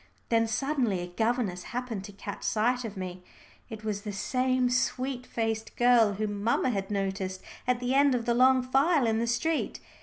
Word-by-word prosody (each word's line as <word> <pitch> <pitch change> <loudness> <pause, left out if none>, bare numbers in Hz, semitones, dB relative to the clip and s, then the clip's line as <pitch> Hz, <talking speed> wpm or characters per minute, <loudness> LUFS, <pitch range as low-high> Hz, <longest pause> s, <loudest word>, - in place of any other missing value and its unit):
Then 230 -1 +3
suddenly 245 -5 0
a - - -3
governess 220 -1 -1 0.2
happened 240 -6 -4
to 205 - -9
catch 200 0 -7
sight 245 +3 +1
of 215 -3 -6
me. 185 -1 -5 0.5
It 220 -2 -8
was 210 -2 -2
the 210 0 -5
same 255 +5 +1
sweet 250 +1 -1
faced 225 -1 -2
girl 240 -4 +5
whom 205 0 -3
mamma 235 +3 +2
had 195 -3 -3
noticed 195 -2 -2 0.2
at 250 -1 +2
the 250 +1 -1
end 280 -1 +4
of 235 -2 -2
the 235 - +2
long 255 +1 +5
file 275 +3 +3
in 220 -1 +1
the 235 - 0
street. 300 +7 -1
230 Hz, 185 wpm, -28 LUFS, 205-250 Hz, 0.5 s, girl